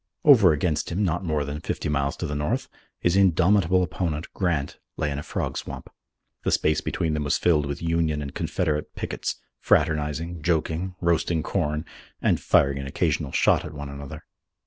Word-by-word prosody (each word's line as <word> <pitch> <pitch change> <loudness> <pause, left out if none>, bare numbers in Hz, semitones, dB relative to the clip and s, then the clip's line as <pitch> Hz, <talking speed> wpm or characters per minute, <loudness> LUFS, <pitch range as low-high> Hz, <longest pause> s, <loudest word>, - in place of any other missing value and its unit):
Over 115 - +8
against 75 +1 0
him, 95 +5 0
not 90 0 0
more 75 -4 0
than 70 +1 -4
fifty - - -3
miles 70 -1 0
to - - -3
the 75 - -3
north, 75 0 -1 0.3
his 90 +1 +2
indomitable 95 0 +4
opponent, 85 -2 -3
Grant, 80 -7 -1 0.2
lay 75 -2 -1
in 70 - -3
a - - -4
frog - - -3
swamp. - - -8 0.5
The - - +1
space 80 - +2
between 80 -2 -1
them 75 -1 -1
was 70 - +1
filled 75 -4 +2
with 70 +3 -5
Union 80 -2 +1
and 70 -1 -5
Confederate 75 -4 -2
pickets, - - -3 0.2
fraternizing, 75 +2 +1
joking, 85 +3 -1
roasting 85 -1 +1
corn, 80 -3 -1 0.3
and - - +2
firing 70 0 +3
an 70 - -5
occasional 70 - -1
shot - - +3
at 80 0 -8
one 75 -1 -6
another. 70 +2 -8
80 Hz, 175 wpm, -25 LUFS, 75-85 Hz, 0.5 s, Over